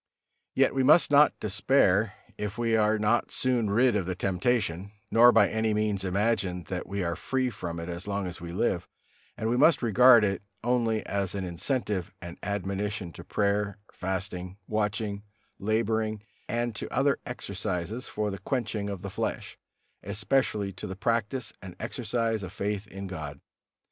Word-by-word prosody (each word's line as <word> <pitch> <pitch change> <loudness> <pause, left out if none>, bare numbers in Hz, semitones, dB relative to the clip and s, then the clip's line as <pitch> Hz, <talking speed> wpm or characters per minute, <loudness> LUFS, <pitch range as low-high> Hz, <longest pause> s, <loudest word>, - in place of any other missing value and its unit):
Yet - - +4
we 135 - +1
must 150 +4 +6
not 145 +1 +5
despair 105 -1 +3 0.2
if 105 0 -4
we 115 -1 +2
are 110 0 +3
not 105 +3 +2
soon 125 -4 +1
rid 120 +3 +4
of 95 -4 0
the 95 - -2
temptation, 95 0 0 0.2
nor 120 +2 +8
by 110 -4 +5
any 110 -1 0
means 105 -2 0
imagine 95 -2 0
that 90 -1 -3
we 100 0 -2
are 85 -1 -1
free 130 -1 -1
from 85 -5 -5
it 85 - -5
as 90 +3 -5
long 100 -1 -1
as 90 -1 -6
we 85 0 -6
live, 85 - 0 0.5
and 110 - -2
we 120 +2 +1
must 150 0 +5
regard 120 +1 +7
it 100 -2 0 0.2
only 115 -2 +1
as 100 -1 -1
an 100 - -2
incentive 95 - -2
and 85 0 -9
admonition 100 -2 -3
to - - -10
prayer, 100 -1 0 0.2
fasting, 95 -1 -4
watching, 105 -1 -1 0.4
laboring, 110 0 0 0.3
and 120 0 -1
to - - -5
other 140 +1 +2
exercises 105 -1 -4
for 105 -1 -2
the 100 - -6
quenching 105 -1 -2
of 100 -3 -5
the - - -4
flesh, - - -3 0.5
especially 105 0 0
to 95 - -7
the 95 - -5
practice 115 +4 -1
and 95 -3 -9
exercise 115 -3 -1
of 95 -1 -6
faith 105 0 -3
in 95 0 -7
God. 75 -6 -6
105 Hz, 165 wpm, -28 LUFS, 95-115 Hz, 0.5 s, nor